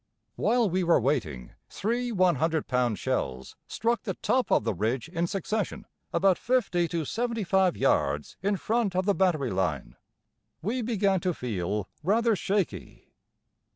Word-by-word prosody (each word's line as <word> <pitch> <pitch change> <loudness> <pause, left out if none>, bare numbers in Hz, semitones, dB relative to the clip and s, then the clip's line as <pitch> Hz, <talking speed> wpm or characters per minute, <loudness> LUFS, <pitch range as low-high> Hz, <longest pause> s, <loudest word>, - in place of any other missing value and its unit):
While 240 -2 +2
we 185 0 0
were 170 -1 +4
waiting 110 - -1 0.2
three 240 +4 -2
100 170 -5 +2
pound 125 -4 +1
shells 65 0 -3
struck 235 +1 0
the - - -4
top 255 -5 0
of - - +4
the 115 -1 0
ridge 115 - -1
in 170 0 -1
succession 200 +2 -3 0.3
about 185 +1 +3
50 230 -9 +1
to 165 -2 -2
75 195 - +1
yards 70 +1 +1
in 200 +1 +1
front 220 -2 0
of 185 0 +1
the 200 - +3
battery 170 -10 +1
line. 80 -10 -2 0.7
We 235 +7 -1
began 205 -4 +1
to 180 0 -1
feel 105 -3 -3
rather 220 +6 +2
shaky. 195 -1 -3
180 Hz, 145 wpm, -27 LUFS, 125-210 Hz, 0.7 s, were